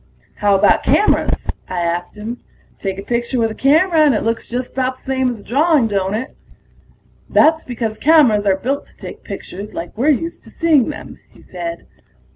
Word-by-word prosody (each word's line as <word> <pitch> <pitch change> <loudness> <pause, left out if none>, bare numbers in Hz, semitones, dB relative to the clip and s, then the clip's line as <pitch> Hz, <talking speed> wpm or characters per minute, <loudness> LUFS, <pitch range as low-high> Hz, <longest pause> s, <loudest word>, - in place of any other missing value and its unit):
"How 205 -1 +3
about 195 - +4
cameras?" 420 - +2 0.2
I 180 -1 -2
asked 175 +4 -3
him. 225 +4 -6 0.4
"Take 195 -1 -3
a 195 - -6
picture 240 +3 -1
with 225 -2 +1
a - - -5
camera 320 +7 +3
and 295 -5 +5
it - - -1
looks 230 +1 -2
just 245 +1 -4
about 260 0 -1
the - - -24
same 260 -1 0
as 235 -4 -6
a - - -17
drawing, 295 +1 +3
don't 200 -2 -1
it?" 245 +5 -5 0.9
"That's 320 +1 +4
because 225 -3 -4
cameras 255 -10 +4
are 190 -1 +3
built 270 +8 -3
to - - -24
take - - -10
pictures 200 +3 -8
like 170 - -6
we're 255 +7 +1
used 330 +3 -1
to - - -14
seeing 310 -7 +2
them," 300 - -8
he - - -20
said. 170 -2 -6
240 Hz, 195 wpm, -18 LUFS, 205-280 Hz, 0.9 s, and